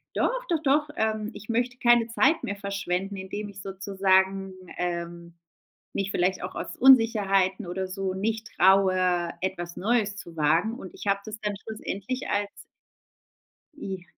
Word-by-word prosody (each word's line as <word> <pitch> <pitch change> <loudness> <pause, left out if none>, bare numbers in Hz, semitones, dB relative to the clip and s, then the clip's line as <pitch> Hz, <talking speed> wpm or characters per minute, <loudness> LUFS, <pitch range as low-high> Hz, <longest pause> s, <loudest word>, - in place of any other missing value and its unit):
doch, - - 0
doch, 330 -3 +1
doch. 295 +2 +2
Ähm, 220 -1 0
ich 210 - -11
möchte 245 +2 0
keine 240 -2 +4
Zeit 270 +7 +2
mehr 200 - -2
verschwenden, 200 -1 -3
indem 205 +2 -5
ich 200 0 -10
sozusagen, 190 0 +1 0.2
ähm, 170 -1 -4 0.6
mich 195 0 -1
vielleicht 185 0 0
auch 185 - -6
aus - - -5
Unsicherheiten 210 -6 +4
oder 185 +2 -3
so 190 0 -3
nicht 215 +3 -2
traue, 185 -2 +4
etwas 175 -2 -3
Neues 210 0 +1
zu 170 -5 -10
wagen. 165 +9 +2
Und 185 - -9
ich - - -10
hab 200 0 +1
das 215 0 -7
dann 210 -1 -2
schlussendlich 220 +4 -4
als 205 0 0 1.3
I 190 -9 -6
195 Hz, 150 wpm, -26 LUFS, 185-220 Hz, 1.3 s, keine